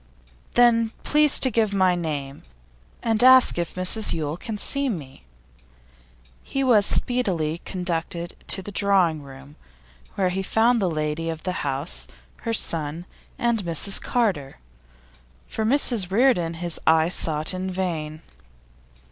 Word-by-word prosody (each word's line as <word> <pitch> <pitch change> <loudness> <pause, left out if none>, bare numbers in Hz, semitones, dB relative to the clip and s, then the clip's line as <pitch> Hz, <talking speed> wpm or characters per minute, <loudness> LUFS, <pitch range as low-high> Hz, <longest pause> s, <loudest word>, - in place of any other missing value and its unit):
'Then 230 -2 +4
please 300 -1 +3
to 260 - +3
give 215 -2 +1
my 185 -2 +3
name, 150 -5 -4 0.6
and 225 0 +1
ask 255 -7 +6
if 170 - -4
Mrs 185 +4 +3
Yule 155 -2 -3
can 210 +5 -6
see 275 +5 0
me.' 140 - -7 1.2
He 275 - -3
was 220 -6 +4
speedily 180 -11 0
conducted 170 -1 -4
to 190 - -2
the 205 - -7
drawing 185 -6 +1
room, 140 +1 -14 0.6
where 185 -2 +1
he 190 +2 -2
found 225 +4 +2
the 185 - +1
lady 155 +1 -3
of 160 -1 -6
the 185 - -2
house, 135 - -4 0.3
her 230 - -4
son, 160 -2 0 0.3
and 235 -1 0
Mrs 175 +2 0
Carter. 195 - -1 0.9
For 220 - -4
Mrs 230 -5 +2
Reardon 190 -7 +2
his 170 0 -3
eye 160 +1 +4
sought 155 -2 0
in 185 +1 -4
vain. 165 -5 -4
180 Hz, 135 wpm, -23 LUFS, 160-225 Hz, 1.2 s, ask